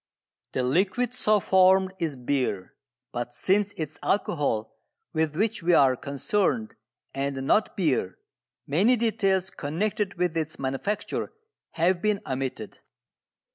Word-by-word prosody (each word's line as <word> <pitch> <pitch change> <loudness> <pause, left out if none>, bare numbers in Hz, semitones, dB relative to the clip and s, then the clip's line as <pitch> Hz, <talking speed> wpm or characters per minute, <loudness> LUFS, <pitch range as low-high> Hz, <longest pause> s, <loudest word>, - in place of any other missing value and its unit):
The 130 - 0
liquid 195 - +1
so 215 -4 +3
formed 190 0 +4
is 160 -4 -1
beer. 125 -7 -2 0.4
But 120 0 -4
since 205 +1 +1
it 155 -3 -4
is 145 - -18
alcohol 145 - 0 0.4
with 160 -2 0
which 215 +3 0
we 175 +1 +3
are 135 -4 +5
concerned, 205 - -1 0.4
and 135 -1 -2
not 215 +9 +2
beer, 135 - 0 0.5
many 195 - +3
details 195 -5 +1
connected 200 +7 -2
with 175 -1 0
its 160 0 -2
manufacture 135 +10 -3 0.4
have 175 +2 +2
been 210 -1 +1
omitted. 130 -4 -4
170 Hz, 125 wpm, -26 LUFS, 135-200 Hz, 0.5 s, are